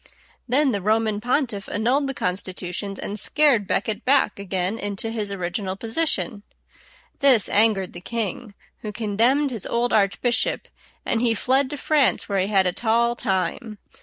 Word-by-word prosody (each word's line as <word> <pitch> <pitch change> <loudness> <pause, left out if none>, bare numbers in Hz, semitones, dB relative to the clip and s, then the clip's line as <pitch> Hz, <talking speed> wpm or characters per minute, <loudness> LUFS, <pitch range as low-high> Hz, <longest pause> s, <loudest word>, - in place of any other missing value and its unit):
Then 270 +3 +2
the 200 -3 -2
Roman 215 +1 0
pontiff 240 -4 -1
annulled 255 +7 +1
the 270 - -4
constitutions, 185 +1 -4
and 205 +1 -4
scared 255 -5 +3
Becket 215 +3 -1
back 265 -6 +2
again 190 +2 -2
into 205 +2 -3
his 210 -3 -3
original 185 +1 -3
position. 230 0 0 0.8
This 260 -7 +5
angered 205 -3 +2
the 175 - -9
king, 220 +1 -4 0.2
who 210 - -6
condemned 230 +7 +1
his 225 -6 -4
old 240 +1 0
archbishop, 235 - +1 0.4
and 225 - 0
he 235 -2 +2
fled 260 +4 +1
to 290 - -5
France, 290 0 +1
where 200 -2 0
he 185 - +1
had 195 -2 +3
a 180 - 0
tall 235 +2 +1
time. 205 +1 -2
220 Hz, 155 wpm, -23 LUFS, 200-245 Hz, 0.8 s, This